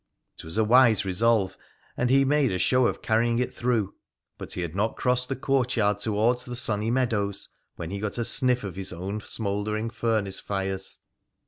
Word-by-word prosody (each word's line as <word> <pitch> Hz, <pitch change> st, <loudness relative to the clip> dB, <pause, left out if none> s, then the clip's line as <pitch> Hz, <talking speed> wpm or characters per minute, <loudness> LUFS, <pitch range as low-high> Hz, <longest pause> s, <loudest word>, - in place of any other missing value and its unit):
It -, -, -8 dB
was 80 Hz, +6 st, -5 dB
a 110 Hz, -, +4 dB
wise 115 Hz, -2 st, +5 dB
resolve, 95 Hz, 0 st, +1 dB, 0.4 s
and 125 Hz, -, 0 dB
he 135 Hz, +1 st, +4 dB
made 145 Hz, -2 st, +2 dB
a 90 Hz, -, -1 dB
show 125 Hz, +6 st, +3 dB
of -, -, -4 dB
carrying 115 Hz, +1 st, +1 dB
it 125 Hz, -, -1 dB
through, 115 Hz, -5 st, -1 dB, 0.5 s
but -, -, -7 dB
he -, -, -4 dB
had 85 Hz, -2 st, -4 dB
not 105 Hz, +3 st, 0 dB
crossed 125 Hz, 0 st, 0 dB
the 135 Hz, -, -1 dB
courtyard 125 Hz, -6 st, 0 dB
towards 115 Hz, +4 st, 0 dB
the 125 Hz, -, -7 dB
sunny 110 Hz, -2 st, -1 dB
meadows 110 Hz, -6 st, -1 dB, 0.3 s
when 85 Hz, +1 st, -7 dB
he 100 Hz, -, -4 dB
got 105 Hz, +2 st, -4 dB
a 120 Hz, -, -1 dB
sniff 125 Hz, +1 st, +5 dB
of 95 Hz, -4 st, -6 dB
his 95 Hz, 0 st, -4 dB
own 95 Hz, +5 st, -5 dB
smouldering 105 Hz, +1 st, -3 dB
furnace 110 Hz, -4 st, -1 dB
fires. 95 Hz, -1 st, -3 dB
110 Hz, 190 wpm, -26 LUFS, 100-125 Hz, 0.5 s, wise